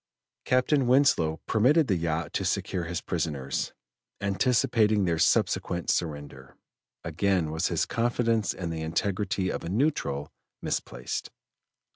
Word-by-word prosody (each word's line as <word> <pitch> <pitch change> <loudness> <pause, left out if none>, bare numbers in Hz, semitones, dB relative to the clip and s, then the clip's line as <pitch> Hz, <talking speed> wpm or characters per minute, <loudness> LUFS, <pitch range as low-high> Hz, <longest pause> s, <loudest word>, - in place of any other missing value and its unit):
Captain 130 +1 +2
Winslow 125 - +3
permitted 140 +9 +4
the 100 - +1
yacht 80 -2 -2
to - - -1
secure 90 -3 -1
his 85 0 -3
prisoners, 75 -6 -2 0.5
anticipating 110 0 +2
their 85 -2 0
subsequent 85 +1 +1
surrender. 70 -5 -4 0.5
Again 85 0 0
was 80 0 0
his - - 0
confidence 115 -2 0
in 85 -3 -5
the 80 -1 -4
integrity 95 +3 -1
of - - -4
a 85 - -5
neutral 85 - -1 0.3
misplaced. - - -4
90 Hz, 120 wpm, -27 LUFS, 80-115 Hz, 0.5 s, permitted